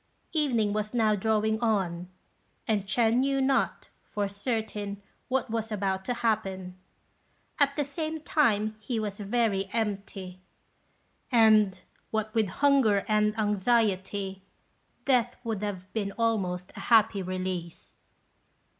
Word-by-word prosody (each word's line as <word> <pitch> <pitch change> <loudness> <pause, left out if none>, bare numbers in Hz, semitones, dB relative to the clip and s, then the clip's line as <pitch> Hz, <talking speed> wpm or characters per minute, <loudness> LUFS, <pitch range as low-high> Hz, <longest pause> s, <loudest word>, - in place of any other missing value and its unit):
Evening 240 -10 +1
was 215 +2 -2
now 220 -2 +3
drawing 220 +1 +1
on, 185 -6 0 0.6
and 210 -3 +1
Ch'ên 230 +2 +3
knew 275 +1 +2
not, 265 0 +1
for 205 -1 -3
certain, 205 -1 -3 0.3
what 255 -3 -1
was 225 -1 -2
about 190 -2 -1
to 245 - -1
happen; 190 -5 -1 0.8
at 280 -1 +3
the 295 - +1
same 315 +3 -4
time 220 -9 +1
he 225 +2 -3
was 210 -2 -4
very 205 -2 0
empty, 200 -4 -3 0.9
and, 215 -5 +5 0.3
what 220 0 -2
with 220 -2 +2
hunger 240 -3 +3
and 210 0 +2
anxiety, 205 -2 0 0.6
death 245 -3 +2
would 225 -4 -3
have 195 -3 -5
been 205 -3 -1
almost 195 -6 -1
a - - -8
happy 225 -3 +5
release. 185 -2 -5
215 Hz, 120 wpm, -28 LUFS, 195-230 Hz, 0.9 s, and